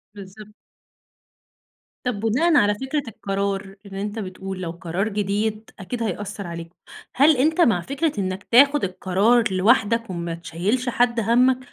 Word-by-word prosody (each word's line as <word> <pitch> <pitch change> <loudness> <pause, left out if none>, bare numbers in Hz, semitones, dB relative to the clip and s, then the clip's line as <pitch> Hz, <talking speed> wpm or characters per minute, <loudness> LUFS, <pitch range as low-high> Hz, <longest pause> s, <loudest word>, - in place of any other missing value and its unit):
بالضبط. 205 +2 -12 1.5
طب 245 -5 -2
بناءً 275 +10 +2
على 205 -5 +4
فكرة 270 +4 -3
القرار- 195 -1 -3
اللي 195 0 -6
أنت 210 +2 -4
بتقول- 190 -1 -6
لو 165 -2 -3
قرار 175 +4 -3
جديد 210 +2 -2
أكيد 230 +5 -4
هيأثر 200 -1 -4
عليك. 170 0 -8 0.4
هل 285 +1 +5
أنت 315 +6 +2
مع 200 - +3
فكرة 285 - -1
إنك 185 0 -3
تاخد 280 +4 +5
القرار 195 +5 +2
لوحدك 230 +3 +2
وما 170 -2 -4
تشيّلش 200 +10 -2
حد 240 -1 +1
همك، 250 +4 +3
210 Hz, 140 wpm, -22 LUFS, 190-245 Hz, 1.5 s, هل